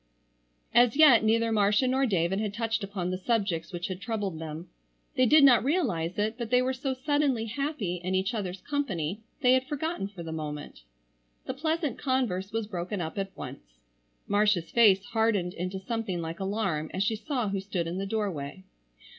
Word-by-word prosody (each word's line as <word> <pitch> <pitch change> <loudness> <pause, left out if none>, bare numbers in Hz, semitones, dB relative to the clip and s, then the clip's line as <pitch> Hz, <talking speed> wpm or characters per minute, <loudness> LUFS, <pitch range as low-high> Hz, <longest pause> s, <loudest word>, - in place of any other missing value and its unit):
As 240 0 +5
yet 275 -8 +7
neither 225 +1 +2
Marcia 210 +3 +3
nor 265 +1 +2
David 190 -1 +1
had 210 -1 -2
touched 225 -1 -1
upon 190 -3 -3
the 185 - -3
subjects 195 -6 -1
which 175 -1 -4
had 185 0 -6
troubled 205 -7 -3
them. 160 +2 -6 0.5
They 255 - +4
did 305 +3 +7
not 245 -5 +7
realize 230 - 0
it, 215 +3 -1
but 235 -2 -3
they 250 +1 +4
were 260 +1 0
so 260 0 -2
suddenly 270 -3 +1
happy 230 - -3
in 185 +1 -1
each 190 +5 0
other's 190 -4 -4
company 205 - -2 0.2
they 250 -1 +5
had 260 0 +2
forgotten 300 - -2
for 195 -4 -9
the 165 - -6
moment. 150 - -6 0.6
The - - -3
pleasant 315 -1 -1
converse 235 -8 -1
was 225 0 -1
broken 185 0 -4
up 160 +3 -4
at 195 -1 -5
once. - - -9 0.5
Marcia's 205 -4 +2
face 205 -4 +5
hardened 220 -6 +1
into 185 +2 -4
something 190 -2 -3
like 165 0 -5
alarm 190 -6 -1
as 190 - +1
she 220 +2 +1
saw 240 0 -2
who 195 0 -1
stood 190 -3 -3
in 170 +3 -3
the 195 - -3
doorway. 190 -6 -3
205 Hz, 185 wpm, -28 LUFS, 180-245 Hz, 0.6 s, yet